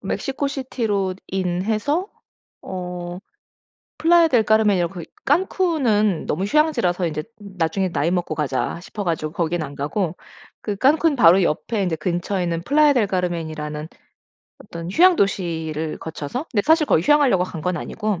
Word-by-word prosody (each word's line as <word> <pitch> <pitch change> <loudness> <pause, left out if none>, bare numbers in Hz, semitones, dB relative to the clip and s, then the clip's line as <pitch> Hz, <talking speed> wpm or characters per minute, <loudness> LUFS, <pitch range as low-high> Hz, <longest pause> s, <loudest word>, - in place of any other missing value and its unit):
멕시코시티로 255 -9 -2 0.2
IN 180 -1 -1
해서 285 - -1 0.5
어 180 -1 -6 0.8
플라야 335 +1 +5
델 245 -6 +3
카르멘이라고 210 -5 +2
그 175 - -6 0.2
칸쿤은 270 - +1
너무 185 +6 -1
휴양지라서 235 - +1
이제 155 -2 -3 0.2
'나중에 190 -2 -2
나이 165 0 0
먹고 175 -3 -1
가자.' 150 +2 -2
싶어가지고 170 -6 -3
거기는 170 -1 -1
안 140 - -8
가고 165 +4 -2 0.4
그 210 - -3
칸쿤 295 +6 +3
바로 185 -3 +6
옆에 200 +7 -1
인제 180 -4 -1
근처에 175 +3 -2
있는 170 -1 -2
플라야 295 - +4
델 240 -6 +2
카르멘이라는 160 -5 -3 0.7
어떤 170 -3 -8
휴양 355 - +5
도시를 160 -5 -1
거쳐서 160 - -5
근데 210 -6 +1
사실 315 -1 +4
거기 160 - +3
휴양하려고 260 -8 +4
간 170 -3 -7
건 180 +1 -1
아니고 210 -3 -3
185 Hz, 345 characters per minute, -21 LUFS, 170-245 Hz, 0.8 s, 바로